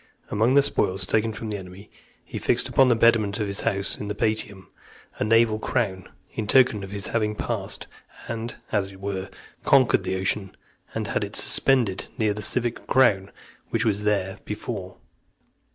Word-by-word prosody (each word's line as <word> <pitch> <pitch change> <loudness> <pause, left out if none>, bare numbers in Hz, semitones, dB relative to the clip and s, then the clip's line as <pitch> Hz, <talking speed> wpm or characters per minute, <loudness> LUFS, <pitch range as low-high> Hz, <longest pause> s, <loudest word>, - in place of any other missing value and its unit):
Among 115 +5 +2
the 140 - +6
spoils 95 -7 +1
taken 110 +4 +1
from 110 0 -6
the 105 - -2
enemy, 95 +2 -11 0.3
he - - -6
fixed - - +1
upon 135 -1 +4
the 120 - +4
pediment 115 -3 +3
of 105 - 0
his 100 -1 -2
house 100 0 -1
in 105 - -5
the 105 - -3
Palatium, 105 -3 -2 0.5
a - - +1
naval 115 0 +3
crown, 100 -7 -2 0.2
in 110 - -4
token 125 -5 +4
of 95 - -7
his 100 0 -2
having 105 -2 0
passed, - - -3 0.4
and, 115 0 -4 0.2
as 100 -3 +1
it 95 -1 -14
were, 95 -1 -4 0.3
conquered - - +4
the - - -2
Ocean, 95 +1 -1 0.4
and - - -3
had - - 0
it - - -6
suspended 120 -8 +3
near 110 -2 +1
the 105 - -6
civic 120 +3 -1
crown 105 -7 +3 0.4
which 115 +1 0
was 105 -2 0
there 95 -2 0
before. 105 -3 -6
105 Hz, 175 wpm, -24 LUFS, 95-115 Hz, 0.5 s, the